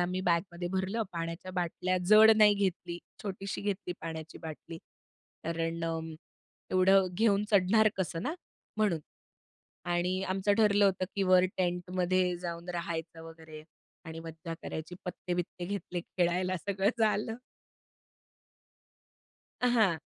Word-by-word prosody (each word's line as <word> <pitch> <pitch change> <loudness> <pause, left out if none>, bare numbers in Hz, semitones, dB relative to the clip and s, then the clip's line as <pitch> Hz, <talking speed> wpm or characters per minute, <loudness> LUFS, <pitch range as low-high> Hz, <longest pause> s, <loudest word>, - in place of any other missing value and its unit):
आम्ही 180 +1 0
बॅगमध्ये 175 0 0
भरलं, 190 +4 0
पाण्याच्या 165 +2 -4
बाटल्या 180 +1 -1
जड 220 +1 +9
नाही 210 -1 +7
घेतली, 185 -3 -2 0.2
छोटीशी 195 -1 -4
घेतली 200 -3 -2
पाण्याची 160 -1 -6
बाटली. 160 +1 -8 0.7
कारण 165 0 -2
अं, 165 -1 -3 0.6
एवढं 190 +1 +5
घेऊन 210 -1 +3
चढणार 215 +2 +5
कसं 170 -3 -2
ना? 305 +9 -2 0.4
म्हणून 205 -7 +1 0.9
आणि 180 +2 0
आमचं 195 +2 +1
ठरलं 205 -2 +5
होतं, 185 -1 +2
की 200 - 0
वर 185 -1 +5
टेंट 180 -1 -1
मध्ये 180 0 +2
जाऊन 170 0 -5
राहायचं 165 -1 -4
वगैरे 160 -1 -11 0.4
आणि 160 0 -7
मज्जा 165 +1 -7
करायची, 160 +3 -6
पत्ते-बित्ते 175 -1 -4
घेतले 180 -2 -4
खेळायला, 180 +1 0
सगळं 200 +1 +2
झालं. 220 +1 +1 2.3
अ, 250 - +3
हां. 215 -9 +3
180 Hz, 120 wpm, -31 LUFS, 165-195 Hz, 2.3 s, जड